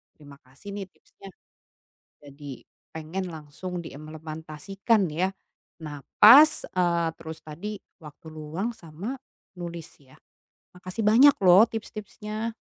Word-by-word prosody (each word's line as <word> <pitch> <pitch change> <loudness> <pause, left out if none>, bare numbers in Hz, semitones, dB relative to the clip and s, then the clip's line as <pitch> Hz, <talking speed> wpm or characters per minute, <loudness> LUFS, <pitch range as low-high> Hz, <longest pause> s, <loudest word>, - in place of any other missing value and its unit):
terima 145 -2 -14
kasih 135 +11 -12
nih 200 -1 -5
tipsnya. 195 - -17 1.0
Jadi 140 -2 -10 0.3
pengen 165 +4 -4
langsung 160 +3 -7
diimplementasikan 160 - -2
ya. 180 +5 +1 0.6
Nah, 145 -1 -7 0.2
pas, 280 +8 +8
eee, 170 -2 +1
terus 160 -1 -9
tadi 185 +8 -6 0.3
waktu 150 +1 -13
luang 160 +9 -4
sama 180 - -7 0.5
nulis 170 -2 -6 0.2
ya. 130 -1 -20 0.6
Makasih 185 +4 -6
banyak 245 +7 +7
loh 190 +5 +7
tips-tipsnya. 215 0 -6
175 Hz, 110 wpm, -26 LUFS, 155-210 Hz, 1.0 s, pas